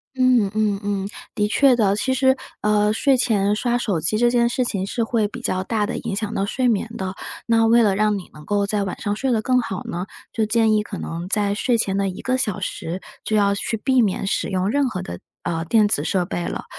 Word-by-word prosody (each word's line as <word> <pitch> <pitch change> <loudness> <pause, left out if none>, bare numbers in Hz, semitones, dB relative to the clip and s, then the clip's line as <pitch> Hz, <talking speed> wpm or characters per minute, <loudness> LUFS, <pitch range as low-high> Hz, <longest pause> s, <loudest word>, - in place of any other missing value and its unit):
嗯， 250 -6 +3
嗯， 215 -2 +1
嗯， 200 -1 -2 0.3
的 210 - +1
确 270 +5 +4
的， 210 -5 +2
其 260 +5 0
实， 265 0 +3 0.3
呃， 210 0 +3
睡 270 +5 +3
前 210 -5 +2
刷 240 +2 0
手 200 -9 -1
机 170 +6 0
这 240 +2 +4
件 240 -1 +3
事 250 +1 0
情 195 -5 -2
是 225 +3 -1
会 225 -2 +1
比 255 - -8
较 185 -5 -1
大 215 +1 0
的 - - -3
影 - - -4
响 215 0 -3
到 195 - 0
睡 250 +5 0
眠 225 -1 +1
的， 190 0 -4 0.3
那 225 -1 +3
为 230 +1 +5
了 205 -4 +3
让 210 0 +2
你 180 - -12
能 150 0 -13
够 205 +2 +1
在 205 0 0
晚 190 - -5
上 205 0 -1
睡 265 +4 -1
得 225 -3 +2
更 255 +2 +2
好 195 -4 -5
呢， 175 +2 -4 0.3
就 220 - +1
建 220 0 +3
议 210 -1 +2
可 210 -2 -7
能 170 +2 -5
在 205 -1 +1
睡 235 +3 +1
前 195 -4 0
的 195 0 +1
一 185 - -7
个 255 0 0
小 210 -7 -1
时， 180 -2 -4 0.2
就 215 - 0
要 200 -1 +3
去 225 +2 -2
避 260 +3 +2
免 195 -2 0
使 - - 0
用 190 0 0
任 280 +2 +1
何 185 -6 -4
的， 85 0 -7 0.2
呃， 165 -1 -2
电 210 +5 +3
子 145 -8 0
设 180 +2 0
备 175 -1 -3
了。 - - -4
210 Hz, 265 characters per minute, -22 LUFS, 195-235 Hz, 0.3 s, 为